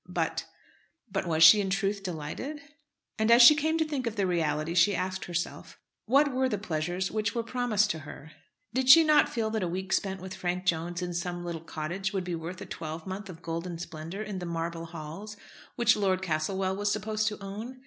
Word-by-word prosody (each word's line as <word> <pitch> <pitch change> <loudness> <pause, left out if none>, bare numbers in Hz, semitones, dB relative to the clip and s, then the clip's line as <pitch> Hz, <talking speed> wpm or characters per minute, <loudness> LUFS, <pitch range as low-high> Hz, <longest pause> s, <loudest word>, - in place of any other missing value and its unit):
But, - - -2 0.6
but 195 -2 -2
was 160 -1 +3
she 205 +6 +9
in 195 - -2
truth 195 +1 0
delighted? 180 - -5 0.6
As 230 +2 +5
she 270 - +11
came 315 +2 0
to 320 - +1
think 280 -5 -3
of 225 - -3
the 200 -2 +1
reality 165 -2 0
she 185 +3 +4
asked 185 +2 -3
herself 175 0 -4 0.3
what 280 +4 +4
were 260 0 +1
the 210 - -1
pleasures 175 0 -2
which 215 0 -1
were 235 - 0
promised 230 -3 +1
to 160 - -5
her. 155 +1 -11 0.4
Did 260 +1 0
she 325 +5 +10
not 305 -1 +4
feel 220 -2 -2
that 220 -1 -1
a 180 - 0
week 190 +2 -3
spent 190 -1 0
with 190 +1 -7
Frank 180 -1 -3
Jones 170 +1 -1
in 175 0 -4
some 175 0 -4
little 170 -2 -4
cottage 170 +5 -4
would 190 -2 -1
be 180 -1 -4
worth 170 +2 -5
a - - -6
twelvemonth 185 +6 -6
of 170 -2 -11
golden 170 +1 -4
splendour 165 +4 -6
in 205 -3 -5
the 175 - -5
"Marble 165 0 -3
Halls" 170 +6 -8 0.4
which 235 -3 +4
Lord 190 -2 0
Castlewell 185 +3 -1
was 205 +1 0
supposed 215 +1 -1
to 210 - -2
own? 215 +6 -7
190 Hz, 205 wpm, -28 LUFS, 170-215 Hz, 0.6 s, she